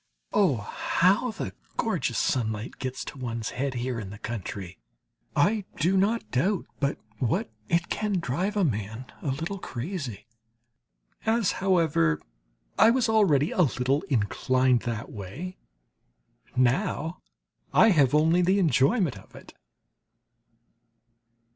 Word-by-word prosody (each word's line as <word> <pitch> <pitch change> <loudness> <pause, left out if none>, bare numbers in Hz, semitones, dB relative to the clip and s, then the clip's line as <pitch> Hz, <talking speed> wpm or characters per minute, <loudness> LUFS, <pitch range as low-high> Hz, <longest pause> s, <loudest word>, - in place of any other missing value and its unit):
Oh, 185 -10 +4
how 185 - +1
the 100 - -5 0.2
gorgeous - - 0
sunlight 110 -2 -1
gets 130 0 -4
to 140 - -8
one's 115 -3 -3
head 135 0 -2
here 120 -1 -2
in 100 -4 -6
the 105 - -9
country! 100 - -6 0.6
I 205 +8 +3
do 180 +5 +2
not 210 +5 +1
doubt 180 +10 +1
but 140 0 0 0.2
what 115 -2 0 0.2
it 170 0 +2
can 210 -1 -1
drive 180 - -1
a 200 - +3
man 110 - -2 0.2
a - - -5
little 165 +9 -2
crazy. 130 - -5 1.0
As, 225 -2 +2
however, 160 - +2 0.6
I - - +8
was 240 -1 +2
already 170 -10 +3
a - - +2
little 135 -1 +1
inclined 130 +2 +2
that 115 -2 -4
way, 115 - -7 1.0
now 135 +6 +1 0.5
I 225 - +6
have 145 -6 +4
only 165 +4 +4
the 185 +3 +3
enjoyment 160 - +2
of - - -18
it. - - -13
140 Hz, 125 wpm, -27 LUFS, 120-185 Hz, 1.0 s, I